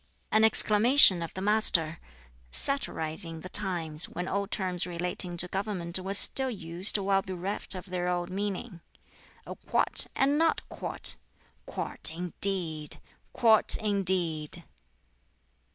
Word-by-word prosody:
An 215 0 +2
exclamation 220 -2 +5
of 165 - -7
the 190 - -7
Master 180 -7 +2 0.5
(satirizing 160 - +2
the 185 - -11
times, 175 -6 0
when 180 +1 -7
old 200 +1 -4
terms 180 -4 -4
relating 175 0 -3
to 180 - 0
government 190 -2 -5
were 190 +2 -5
still 265 +6 +4
used 185 -2 +1
while 195 -1 -1
bereft 190 +2 -7
of 185 - -9
their 180 -2 -5
old 175 0 -4
meaning): 195 -1 -6 0.6
"A - - -9
quart, - - +2
and 280 +3 0
not 330 0 0
a - - -29
quart! - - -1 0.5
quart, - - -6
indeed! 175 -3 +1 0.3
quart, 220 -3 +2
indeed!" 180 -6 -1
185 Hz, 125 wpm, -26 LUFS, 170-205 Hz, 0.6 s, exclamation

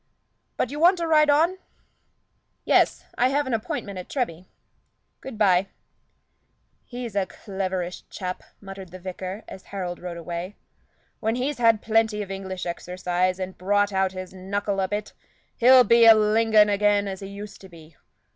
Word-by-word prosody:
But 250 - -1
you 295 - -5
want 355 +3 +5
to 340 - -2
ride 305 -2 +4
on?" 330 +6 +3 1.1
"Yes; - - +2
I 245 - +5
have 285 +2 0
an 260 - -3
appointment 205 -3 -4
at 180 - -9
Treby. 185 - -3 0.7
Good 265 -4 -9
bye." 195 -2 +3 1.2
"He's 240 -4 -7
a 195 -2 +1
cleverish 185 -3 -5
chap," 185 -1 -5 0.2
muttered 195 -2 -10
the 185 - -10
vicar, 185 +2 -7
as 190 - -11
Harold 180 -3 -5
rode 175 -1 -6
away. 170 +4 -6 0.6
"When 225 +1 -1
he's 260 +2 -2
had 230 -3 +3
plenty 220 -1 +1
of 195 - -9
English 190 -1 -5
exercise, 180 +1 -2
and 185 0 -5
brought 205 +2 +1
out 190 -1 +1
his 185 -1 -7
knuckle 195 +1 -3
a 190 - +1
bit, 210 +1 -4 0.4
he'll 255 +1 +7
be 235 -1 +5
a 225 - +10
Lingon 215 0 +4
again 205 0 +2
as 190 -1 -5
he 195 - -7
used 200 +1 -9
to 190 - -13
be. 165 -2 -16
200 Hz, 165 wpm, -24 LUFS, 185-225 Hz, 1.2 s, a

